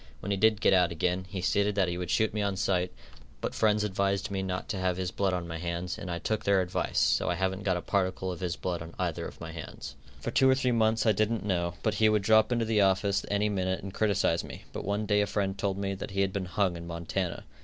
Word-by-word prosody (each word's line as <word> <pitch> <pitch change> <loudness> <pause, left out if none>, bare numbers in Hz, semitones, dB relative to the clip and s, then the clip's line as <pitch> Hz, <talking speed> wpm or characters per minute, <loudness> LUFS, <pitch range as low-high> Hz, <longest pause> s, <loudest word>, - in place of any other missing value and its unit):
When 100 - -4
he 100 - +1
did 110 +1 +3
get - - +5
out 90 -2 +4
again, 90 +3 -1
he 95 -1 -4
stated 100 +2 +1
that 95 -3 +2
he 85 - -2
would 90 -1 -4
shoot 110 +2 +2
me 105 - -1
on 100 -1 0
sight, 90 -1 0 0.5
but - - -3
friends 105 -1 +2
advised 100 -1 0
me 95 -1 -1
not 95 -1 -3
to 100 -5 -2
have 90 -1 0
his 90 -1 -2
blood 100 -1 0
on 90 -2 -2
my 80 0 -5
hands, 85 +1 -3
and 95 - -7
I 85 - -2
took 110 +4 -2
their 100 -1 +3
advice, 90 -1 -2
so - - +3
I 90 - +1
haven't 95 +1 -1
got 95 -3 +1
a 90 - -5
particle 95 -1 0
of 90 - -6
his 90 -2 -2
blood 90 -2 -3
on 80 0 -9
either - - -2
of - - -12
my 80 -1 -7
hands. 80 -1 -8 0.2
For - - -4
two 130 - +4
or 130 - +5
three 130 -1 +1
months 110 -1 +2
I 110 - +6
didn't 110 +1 0
know 85 -3 0
but 110 - +1
he 110 - +6
would 105 -2 +2
drop 110 +3 +5
into 120 -1 +1
the 110 -2 +2
office 95 +1 +2
any 105 +1 +1
minute 95 -3 -1
and 100 -1 -6
criticise 100 -6 +1
me, - - -9
but - - -4
one 100 +2 -1
day 105 -1 +3
a 105 - +1
friend 95 -1 -1
told 95 0 -1
me 100 0 -2
that 95 - -6
he 100 0 -1
had 95 -1 0
been 100 -2 -2
hung 95 -1 0
in 85 0 -7
Montana. 85 +2 -3
95 Hz, 270 wpm, -29 LUFS, 90-105 Hz, 0.5 s, I